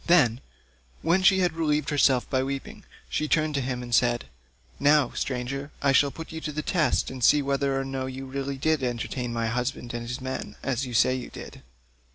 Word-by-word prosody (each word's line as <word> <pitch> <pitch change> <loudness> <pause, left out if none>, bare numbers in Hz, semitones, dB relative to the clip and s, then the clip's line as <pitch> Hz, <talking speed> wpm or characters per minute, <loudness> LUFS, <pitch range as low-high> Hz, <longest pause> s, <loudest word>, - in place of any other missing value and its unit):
Then, 125 -9 +4 0.6
when 170 +4 +3
she 190 0 +5
had 175 -3 +2
relieved 150 -3 0
herself 135 -3 +3
by 130 - +1
weeping, 135 +1 -5 0.2
she 155 - -1
turned 155 0 +2
to 140 - 0
him 125 0 -2
again - - -6
and 120 -1 -6
said: 120 +1 +3 0.5
"Now, 145 -2 +4
stranger, 135 +2 -3
I 140 - +3
shall 140 +1 +4
put 160 +3 -9
you 160 0 -6
to 155 - -3
the 155 +1 -4
test 155 -9 +1
and 130 -2 -6
see 145 +4 +5
whether 140 0 0
or 135 - -2
no 135 -1 -3
you 130 +1 -6
really 135 +1 -4
did 155 +1 +1
entertain 120 0 -3
my 115 -1 -1
husband 120 +1 -2
and 120 0 -4
his 125 +3 -4
men, 130 0 -5
as 135 0 -1
you 120 - -5
say 130 - +4
you 130 -1 -4
did. - - -10
135 Hz, 210 wpm, -26 LUFS, 125-150 Hz, 0.6 s, she